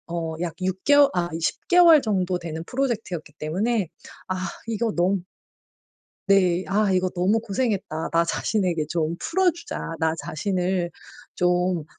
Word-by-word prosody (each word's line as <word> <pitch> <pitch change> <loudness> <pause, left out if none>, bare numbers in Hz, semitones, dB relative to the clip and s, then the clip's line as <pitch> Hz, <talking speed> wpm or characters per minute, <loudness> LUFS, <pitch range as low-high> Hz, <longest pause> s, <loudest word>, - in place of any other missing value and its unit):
어 165 -1 -3
약 170 -3 -2
6 185 0 -2
개워 285 -1 +6
아 175 -1 0
10 165 - -2
개월 340 -4 +7
정도 185 -6 0
되는 160 -2 -5
프로젝트였기 225 - -3
때문에 195 +6 0 0.4
아 185 - -2 0.3
이거 225 0 -1
너무 180 +1 +1 1.1
네. 185 -2 +3
'아 200 0 +2
이거 185 0 +2
너무 190 +5 +1
고생했다. 200 -7 -2
나 170 0 +3
자신에게 175 -2 0
좀 165 0 -1
풀어 370 +1 +2
주자. 340 +1 -7 0.2
나 160 0 +1
자신을 180 +1 -1 0.4
좀 180 -2 +1
185 Hz, 250 characters per minute, -24 LUFS, 170-220 Hz, 1.1 s, 개월